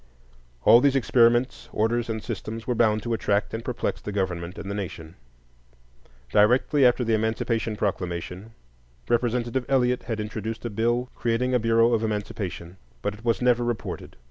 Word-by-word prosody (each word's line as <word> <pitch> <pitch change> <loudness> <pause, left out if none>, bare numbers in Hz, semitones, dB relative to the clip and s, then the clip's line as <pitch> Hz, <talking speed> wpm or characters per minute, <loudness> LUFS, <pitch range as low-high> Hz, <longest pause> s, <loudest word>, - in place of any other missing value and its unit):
All 120 - +7
these 140 0 +3
experiments, 120 -1 +2
orders, 115 +2 0
and 110 -1 -3
systems 115 0 -5
were 125 - 0
bound 110 -2 +2
to 120 - -2
attract 105 -2 0
and 110 +1 -4
perplex 125 -1 -3
the 105 - -5
government 90 -3 -3
and - - -7
the 100 - -3
nation. 90 -5 -6 1.2
Directly 125 - +4
after 125 0 +4
the 115 -1 0
Emancipation 110 0 0
Proclamation, 95 +1 -4 0.6
Representative 120 +1 0
Eliot 125 -2 +2
had 115 -2 -3
introduced 110 +2 -5
a 120 - -3
bill 120 +4 0
creating 120 +2 0
a 125 - +4
Bureau 115 +1 +3
of 115 - +2
Emancipation; 100 -5 -4 0.3
but 105 - -1
it 105 +2 -14
was 115 +1 0
never 120 -1 +3
reported. 120 -2 -4
115 Hz, 160 wpm, -25 LUFS, 105-120 Hz, 1.2 s, All